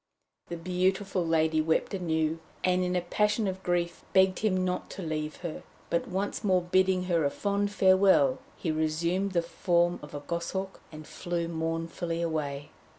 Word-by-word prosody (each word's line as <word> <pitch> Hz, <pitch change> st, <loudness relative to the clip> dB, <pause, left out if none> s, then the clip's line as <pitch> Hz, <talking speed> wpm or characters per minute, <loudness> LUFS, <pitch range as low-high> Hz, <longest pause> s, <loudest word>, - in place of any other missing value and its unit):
The 170 Hz, -, -5 dB
beautiful 185 Hz, +2 st, 0 dB
lady 160 Hz, -1 st, +2 dB
wept 160 Hz, +5 st, 0 dB
anew, 160 Hz, -3 st, 0 dB, 0.2 s
and 185 Hz, 0 st, +2 dB
in 180 Hz, 0 st, -1 dB
a 180 Hz, -, +2 dB
passion 210 Hz, +4 st, +1 dB
of 190 Hz, 0 st, -3 dB
grief 175 Hz, -1 st, -1 dB
begged 190 Hz, -1 st, +4 dB
him 185 Hz, -4 st, +1 dB
not 180 Hz, 0 st, -2 dB
to 190 Hz, -, -5 dB
leave 155 Hz, -1 st, -3 dB
her; 165 Hz, -, -4 dB, 0.3 s
but 170 Hz, -, +1 dB
once 195 Hz, +4 st, -2 dB
more 185 Hz, -3 st, +3 dB
bidding 185 Hz, +1 st, +2 dB
her 170 Hz, -3 st, +1 dB
a 140 Hz, -, +3 dB
fond 200 Hz, +5 st, -1 dB
farewell, 195 Hz, +7 st, +4 dB, 0.2 s
he 165 Hz, -, -1 dB
resumed 170 Hz, +5 st, 0 dB
the 170 Hz, -1 st, +2 dB
form 175 Hz, 0 st, +1 dB
of 150 Hz, -, -10 dB
a 145 Hz, -, -5 dB
goshawk, 175 Hz, +5 st, -4 dB
and 155 Hz, -1 st, -9 dB
flew 170 Hz, 0 st, -3 dB
mournfully 165 Hz, +1 st, -3 dB
away. 150 Hz, -4 st, -3 dB
175 Hz, 165 wpm, -29 LUFS, 165-190 Hz, 0.3 s, begged